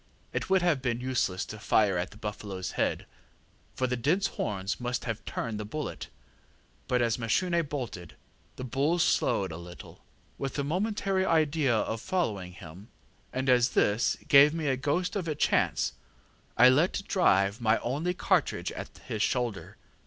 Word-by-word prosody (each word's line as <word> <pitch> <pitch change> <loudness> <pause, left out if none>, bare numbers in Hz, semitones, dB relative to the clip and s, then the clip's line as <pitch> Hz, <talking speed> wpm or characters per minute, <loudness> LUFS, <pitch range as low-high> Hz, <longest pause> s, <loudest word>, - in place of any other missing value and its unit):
It - - -3
would 190 -1 +3
have 165 -7 +2
been 120 -2 -1
useless 125 -8 -1
to 110 - -8
fire 105 -2 +2
at 90 +1 -1
the - - -15
buffaloŌĆÖs 105 -3 -5
head, - - -1 0.7
for 130 - 0
the 125 0 0
dense 155 +11 +1
horns 100 - -2
must 125 -1 -3
have 115 -2 -4
turned 110 -3 -4
the - - -3
bullet; 105 - -5 0.8
but 125 -1 +2
as 115 0 0
Mashune 170 +10 +1
bolted, 120 - -6 0.4
the - - -7
bull 140 +7 0
slewed 95 - +1
a 80 - -6
little, 85 +1 -12 0.4
with 135 -2 -3
the 140 - -1
momentary 195 +4 0
idea 155 -7 +2
of 110 +1 -2
following 105 - -2
him, 90 +4 -12 0.4
and 130 +1 -3
as 125 -1 +4
this 105 +4 +2
gave 145 +3 +7
me 160 -2 -3
a 130 - +2
ghost 150 +9 -1
of 185 -4 -2
a 155 - -1
chance, - - +1 0.6
I 125 - +8
let 155 +9 +3
drive 100 - +2
my 110 0 +3
only 155 +9 -2
cartridge - - 0
at - - -6 0.2
his 110 - -3
shoulder. 120 -4 -1
125 Hz, 165 wpm, -29 LUFS, 105-155 Hz, 0.8 s, I